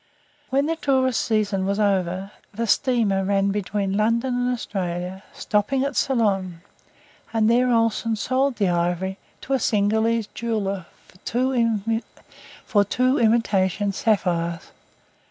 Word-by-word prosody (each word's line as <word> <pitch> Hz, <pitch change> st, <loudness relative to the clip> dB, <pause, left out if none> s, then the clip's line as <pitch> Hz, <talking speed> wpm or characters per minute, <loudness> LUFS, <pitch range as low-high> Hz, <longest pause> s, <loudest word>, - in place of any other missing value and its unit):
When 275 Hz, +2 st, +2 dB
the 325 Hz, +1 st, -1 dB
tourist 260 Hz, -5 st, +1 dB
season 210 Hz, -3 st, 0 dB
was 200 Hz, +1 st, -1 dB
over, 190 Hz, -1 st, 0 dB, 0.2 s
the 230 Hz, +3 st, -3 dB
steamer 220 Hz, -5 st, +2 dB
ran 195 Hz, 0 st, +1 dB
between 200 Hz, -1 st, -2 dB
London 230 Hz, +4 st, +1 dB
and 245 Hz, 0 st, 0 dB
Australia, 185 Hz, -5 st, -4 dB
stopping 215 Hz, +6 st, 0 dB
at 280 Hz, -1 st, -2 dB
Ceylon, 195 Hz, -9 st, 0 dB, 0.7 s
and 220 Hz, -1 st, +2 dB
there 245 Hz, +2 st, +3 dB
Olsen 230 Hz, -1 st, +1 dB
sold 260 Hz, +5 st, 0 dB
the 200 Hz, -4 st, +1 dB
ivory 175 Hz, +2 st, -1 dB, 0.2 s
to 270 Hz, -, -3 dB
a 265 Hz, -, +2 dB
Cingalese 220 Hz, +1 st, +1 dB
jeweller 200 Hz, -6 st, -2 dB, 1.8 s
for 205 Hz, -2 st, +3 dB
two 255 Hz, +6 st, +1 dB
imitation 205 Hz, -4 st, +2 dB
sapphires. 175 Hz, -7 st, -1 dB
210 Hz, 120 wpm, -23 LUFS, 195-235 Hz, 1.8 s, there